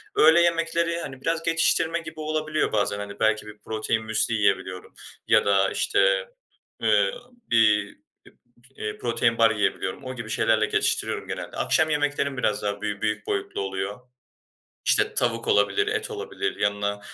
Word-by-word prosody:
Öğle 170 - +6
yemekleri, 170 0 +1
hani, 135 -4 -8
biraz 165 +2 -1
geçiştirme 165 0 +2
gibi 160 -1 -10
olabiliyor 155 0 -1
bazen, 100 -1 0
hani, 100 0 -7
belki 110 -1 +2
bir 105 0 -11
protein 110 0 -2
müsli 110 +1 0
yiyebiliyorum 95 -3 -1 0.3
ya - - +4
da, 95 -1 +3
işte, - - +1 0.5
ııı, - - +3 0.4
bir 105 -3 +3 0.3
p - - -17 0.5
eee, 105 0 -4
protein 115 -1 0
bar 115 -1 +6
yiyebiliyorum. 105 +2 -1
O 130 0 -6
gibi 115 -2 -7
şeylerle 110 -1 +2
geçiştiriyorum - - -1
genelde. - - -6
Akşam 160 0 +2
yemeklerim 145 -2 0
biraz 105 -5 0
daha 100 0 -2
büy 105 -1 -3
büyük 105 0 -2
boyutlu 100 0 -2
oluyor. 95 +3 -4 0.9
İşte, - - +2
tavuk - - 0
olabilir, 415 0 +2
et 435 +1 -2
olabilir, 420 -1 -4
yanına 100 0 -1
115 Hz, 150 wpm, -25 LUFS, 105-165 Hz, 0.9 s, Öğle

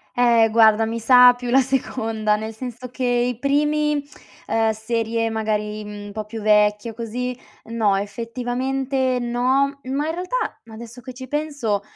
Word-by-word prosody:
Eh, 235 -2 +4
guarda, 220 0 +5
mi 230 +1 -3
sa 250 +1 +7
più 245 0 -7
la 265 +2 +5
seconda, 225 -5 0
nel 220 +1 -5
senso 250 +2 -7
che 260 - -5
i 245 -1 0
primi, 295 +1 +1 0.4
ehm, 225 +1 +1
serie 225 +1 -2
magari, 215 -1 -2
mhmm, 205 0 -8
un - - -9
po' 215 0 -5
più 220 +1 -7
vecchi 210 +1 +3
o 225 - -8
così, 245 +2 -4 0.4
no, 215 -4 +2
effettivamente 250 +5 -2
no; 260 +4 0
ma 275 +3 -2
in 320 - -2
realtà, 365 +8 -3
adesso 235 +2 -10
che 255 0 -9
ci 260 +1 -8
penso, 285 -8 -2
235 Hz, 160 wpm, -22 LUFS, 220-260 Hz, 0.4 s, sa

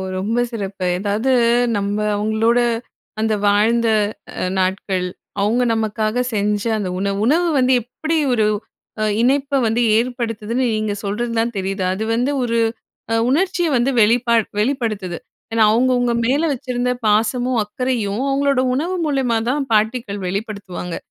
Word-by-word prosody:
ரொம்ப 210 +6 -1
சிறப்பு, 195 -5 -4
எதாவது 210 +6 0 0.5
நம்ம 200 0 -1 0.2
அவுங்களோட 220 +3 +2 0.6
அந்த 220 0 +1
வாழ்ந்த 225 +3 +3 0.5
அ - - 0
நாட்கள், 185 0 0 0.4
அவுங்க 225 +5 +2
நமக்காக 220 +2 0
செஞ்ச 205 -1 0 0.2
அந்த 200 -3 -3
உணவு, 195 0 -1
உணவு 335 +7 +3
வந்து 255 0 +3
எப்பிடி 315 +8 -3 0.2
ஒரு, 220 -3 +2 0.6
அ - - +2 0.2
இணைப்ப 275 +2 +2
வந்து 225 +2 +1
ஏற்படுத்துதுன்னு 235 0 -1
நீங்க 215 -1 -1
சொல்றது 215 +4 -2
தான் 235 +1 0
தெரியுது. 195 0 -2
அது 200 +3 -3
வந்து 245 +5 +1
ஒரு, 230 -1 0 0.5
அ - - +2 0.2
உணர்ச்சிய 350 +3 +1
வந்து 245 +3 +1
வெளிப்பா 235 +2 +3 0.2
வெளிப்படுத்துது. 215 - -1 0.3
ஏன்னா, 225 -1 +4
அவுங்கவுங்க 245 +1 +2
மேல 270 +5 +2
வச்சிருந்த 250 -1 -2 0.2
பாசமும், 230 +4 +1
அக்கரையும், 220 -1 -2
அவங்களோட 275 -1 +2
உணவு 335 +8 -1
மூலியமா 265 -6 +1
தான் 280 +1 0
பாட்டிக்கள் 220 -1 0
வெளிப்படுத்துவாங்க. 195 -3 -5
230 Hz, 130 wpm, -19 LUFS, 205-255 Hz, 0.6 s, ஏன்னா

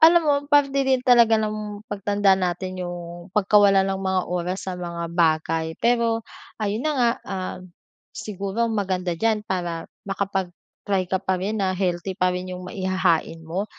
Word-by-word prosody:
alam 335 +2 +7
mo 285 - +5
parte 290 -2 +4
din 265 -1 +2
talaga 235 -3 +6
ng 210 -1 -4
pagtanda 200 -1 +2
natin 185 0 -2
yung 175 0 -7
pagkawala 205 -1 +5
ng 195 0 -1
mga 190 -1 +1
oras 180 +2 -2
sa 185 - -2
mga 170 -1 -4
bagay, 160 -1 +1
pero 235 -1 +2 0.4
ayun 210 +2 -1
na 305 - +2
nga, 240 -2 +4 0.2
ah, 190 -1 -4 0.6
siguro 210 0 -2
maganda 185 -4 -1
diyan 215 +2 +1
para 175 -3 -3 0.2
makapag-try 195 0 -2
ka 190 - +1
pa 190 -1 0
rin 210 +2 -2
na 185 - +1
healthy 180 0 -1
pa 185 -1 +2
rin 180 0 -4
yung 180 0 -8
maihahain 185 -4 0
mo 180 +5 -2
190 Hz, 155 wpm, -23 LUFS, 180-210 Hz, 0.6 s, alam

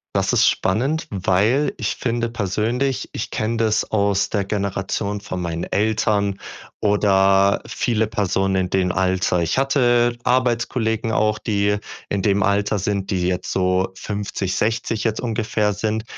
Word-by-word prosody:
Das - - +1
ist - - +4
spannend, 135 - 0
weil 105 +8 +1
ich - - -2
finde 115 -1 -1
persönlich 115 +5 -1
ich - - -4
kenne 115 +2 -2
das 110 -1 +2
aus 100 -2 +1
der 100 -3 -1
Generation 100 0 -2
von 95 -3 -5
meinen 85 -1 -3
Eltern 105 -2 0 0.4
oder 100 -1 +3
viele 110 -2 0
Personen 95 -2 0
in 95 -1 0
dem 90 -1 +1
Alter. 95 -1 +1
Ich 85 +6 -1
hatte 120 -3 +2
Arbeitskollegen 120 -3 0
auch, 105 -1 +1
die 105 -1 0 0.3
in 100 - -1
dem 100 -1 +2
Alter 100 +1 +1
sind, 100 0 -2
die 90 -2 0
jetzt 90 0 -2
so 95 0 +1
50, 100 -1 -3
60 115 0 -1
jetzt 110 -1 -1
ungefähr 110 -3 0
sind. 110 +2 -2
105 Hz, 145 wpm, -21 LUFS, 95-115 Hz, 0.4 s, ist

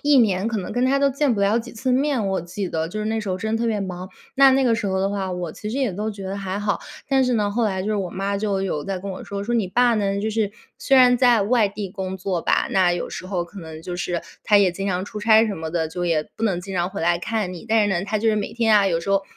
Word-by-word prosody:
一 290 0 +4
年 200 -4 +2
可 230 -1 -1
能 185 - -5
跟 245 +1 +1
他 270 +2 +3
都 280 0 +3
见 275 -2 +1
不 200 - -2
了 200 +3 +3
几 240 +1 -7
次 255 +3 -2
面， 260 -5 +1
我 190 -1 0
记 175 +3 -5
得。 160 -1 -2
就 215 +6 -5
是 210 - -2
那 220 0 -1
时 210 - -6
候 185 - -1
真 220 +3 -2
的 - - -3
特 235 - 0
别 215 -3 0
忙， 185 -1 -5 0.3
那 270 -1 +7
那 270 +1 +3
个 245 -3 +3
时 230 -3 -2
候 190 -1 0
的 195 +1 0
话， 195 -2 -2
我 180 -2 -4
其 210 - -7
实 240 +5 -3
也 260 -5 +1
都 210 +4 -3
觉 200 -1 -9
得 190 +1 -4
还 195 -1 -4
好。 205 -4 0 0.3
但 265 -1 +3
是 250 - +1
呢， 210 -3 +1
后 230 +3 0
来 190 -3 -1
就 200 - -3
是 215 - 0
我 195 -3 -2
妈 195 +1 -2
就 200 -1 -1
有 155 -6 -2
在 195 -2 -3
跟 200 +1 -5
我 185 - -7
说， 200 0 -5
说： 225 +4 -3
“你 220 -4 +1
爸 240 +5 +3
呢， 200 -2 0
就 215 +2 -1
是 215 -2 -1 0.3
虽 270 - +3
然 250 -1 +6
在 240 -4 +5
外 220 +1 +3
地 200 -1 -5
工 190 -1 -5
作 185 -2 -2
吧， - - +1
那 185 -2 +3
有 175 - -3
时 185 - -7
候 185 -2 -2
可 185 +4 -12
能 160 -2 -9
就 175 +1 -5
是 175 -1 -2 0.2
他 210 - +5
也 195 -2 +4
经 195 +3 -5
常 185 -1 -1
出 210 - -7
差 220 +1 +5
什 200 - -3
么 160 0 -5
的， 160 -1 -1
就 175 +2 -4
也 165 -3 +1
不 225 - -2
能 190 -5 0
经 195 +2 -8
常 175 0 0
回 - - -6
来 170 +1 +2
看 205 0 -2
你。 175 - -9
但 225 0 +4
是 205 - +1
呢， 175 +1 -1
他 215 0 0
就 225 +2 +1
是 215 - +2
每 205 - -3
天 225 -2 +3
啊， 200 -1 +4
有 165 -3 +1
时 185 - -4
候 195 0 +3
200 Hz, 340 characters per minute, -22 LUFS, 185-225 Hz, 0.3 s, 那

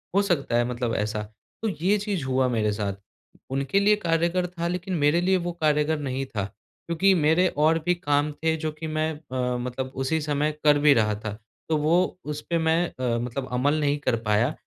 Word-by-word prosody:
हो 200 - +5
सकता 165 -11 0
है 120 - +2
मतलब 120 -1 -2
ऐसा, 105 0 -1 0.4
तो 225 - -1
ये 185 +4 +1
चीज़ 200 -6 -2
हुआ 130 0 +2
मेरे 105 -1 +1
साथ 100 -1 -2 0.6
उनके 140 +7 +1
लिए 210 +1 +4
कार्यगर 170 -1 0
था 170 -1 -4
लेकिन 180 +1 -3
मेरे 150 +4 +4
लिए 185 +1 +3
वो 175 - -1
कार्यगर 150 0 +2
नहीं 135 -1 -3
था 105 -6 -3
क्योंकि 170 - -1
मेरे 160 +3 +3 0.2
और 160 +1 +4
भी 180 0 +3
काम 145 -2 0
थे 160 +2 -1
जो 155 0 -3
कि 155 +1 -7
मैं 155 0 -1
अ, 130 -5 -3
मतलब 125 +1 -4
उसी 160 +5 0
समय 150 0 0
कर 150 -1 +6
भी 145 -1 +6
रहा 105 -3 +2
था। 110 -1 -5 0.4
तो 160 - +2
वो 155 +3 +2 0.3
उस 150 0 -4
पे 170 - +2
मैं 160 +1 +2
अ, 125 -2 -2
मतलब 125 +2 -4
अमल 145 +5 +2
नहीं 145 -1 +1
कर 130 -4 +1
पाया 105 +7 +2
150 Hz, 205 wpm, -25 LUFS, 130-170 Hz, 0.6 s, कर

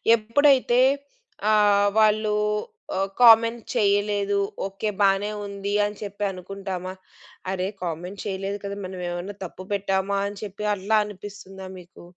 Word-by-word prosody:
ఎప్పుడైతే 250 +2 +3 0.7
ఆహ్, 205 -1 +4
వాళ్ళు 215 0 +3 0.6
ఆహ్, 195 +1 0
కామెంట్ 230 0 +7
చేయలేదు. 205 0 +2 0.3
ఓకే 195 +2 -3
బానే 200 +1 +3
ఉంది 200 0 -4
అని 205 0 -5
చెప్పి 205 0 -5
అనుకుంటామా? 185 0 -6 0.6
అరే! 185 -1 -1 0.2
కామెంట్ 175 +3 -5
చేయలేదు 195 0 -3
కదా! 200 0 -4
మనం 185 0 -7
ఏమన్నా 175 +4 -5
తప్పు 185 +1 -10
పెట్టామా 195 0 0
అని 205 0 -7
చెప్పి 210 +1 -6
అట్లా 205 +3 +1
అనిపిస్తుందా 195 -1 -9
మీకు? 175 0 -15
200 Hz, 125 wpm, -24 LUFS, 190-210 Hz, 0.7 s, కామెంట్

